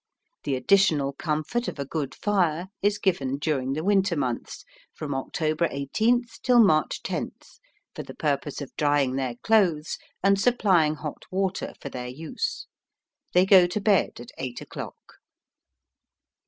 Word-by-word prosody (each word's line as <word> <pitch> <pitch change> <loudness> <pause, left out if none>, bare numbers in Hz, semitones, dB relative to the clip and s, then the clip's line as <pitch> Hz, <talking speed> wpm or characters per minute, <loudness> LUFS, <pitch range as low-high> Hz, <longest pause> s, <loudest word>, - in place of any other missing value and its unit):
The 135 - 0
additional 145 -1 +3
comfort 155 - -2
of - - -4
a 140 - -3
good 145 -1 -4
fire 180 -4 0
is 205 +1 +2
given 140 -10 0
during 140 -3 -1
the 155 +3 -3
winter 195 -2 +2
months, 130 -5 -3 0.3
from 145 -2 -4
October 155 +4 -1
18th 230 - 0
till 250 -2 +4
March 155 -9 +3
10th, - - -6 0.3
for - - -6
the - - -10
purpose 145 0 -2
of 140 - -8
drying 145 -3 +2
their 130 -3 -2
clothes 180 -9 +2 0.2
and 195 0 +4
supplying 190 -10 +3
hot 150 -1 -7
water 190 0 -2
for 140 - -6
their 125 -2 -6
use. 165 - -4 0.7
They 180 +1 +5
go 190 -2 +7
to 180 +4 -2
bed 200 - +2
at 120 - -10
eight 130 -2 -4
o'clock." - - -10
155 Hz, 145 wpm, -26 LUFS, 140-195 Hz, 0.7 s, go